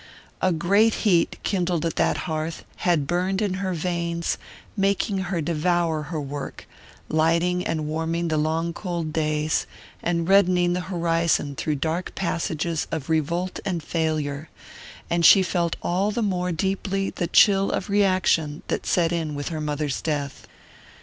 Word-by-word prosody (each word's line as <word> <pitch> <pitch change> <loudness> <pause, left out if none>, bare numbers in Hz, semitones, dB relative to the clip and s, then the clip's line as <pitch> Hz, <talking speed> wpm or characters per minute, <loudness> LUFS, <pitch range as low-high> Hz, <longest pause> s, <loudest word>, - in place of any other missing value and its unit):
A 185 - +3
great 200 +7 +3
heat, 175 -5 +3
kindled 175 -4 0
at 165 - -1
that - - +1
hearth, 160 -1 -3
had 170 -6 +1
burned 180 +5 0
in 205 -4 0
her 185 -2 -1
veins, 170 0 -2 0.4
making 195 0 +1
her 175 -3 -1
devour 170 0 +1
her 155 +2 -4
work, 140 -1 -6 0.4
lighting 170 +3 +2
and 155 -2 -2
warming 165 +2 -1
the 155 - +1
long 160 +2 0
cold 170 -4 -4
days, 155 -1 0 0.3
and 170 -1 0
reddening 180 -2 +4
the 180 - -1
horizon 165 -4 +1
through 155 +1 -1
dark 160 +5 -2
passages 165 -2 -2
of 160 -1 -3
revolt 170 +4 0
and 175 -5 -2
failure; 155 -2 -2 0.6
and 170 0 0
she 190 +3 +8
felt 175 -2 0
all 190 +4 +1
the 220 +2 -1
more 180 -3 0
deeply 195 +3 -1
the 175 - -2
chill 195 +2 +5
of - - -2
reaction 185 -7 +2
that - - -2
set 170 -2 +2
in 160 -3 -2
with 145 0 -3
her 160 -2 -4
mother's 150 -2 -2
death. 145 -3 -3
170 Hz, 150 wpm, -24 LUFS, 155-180 Hz, 0.6 s, she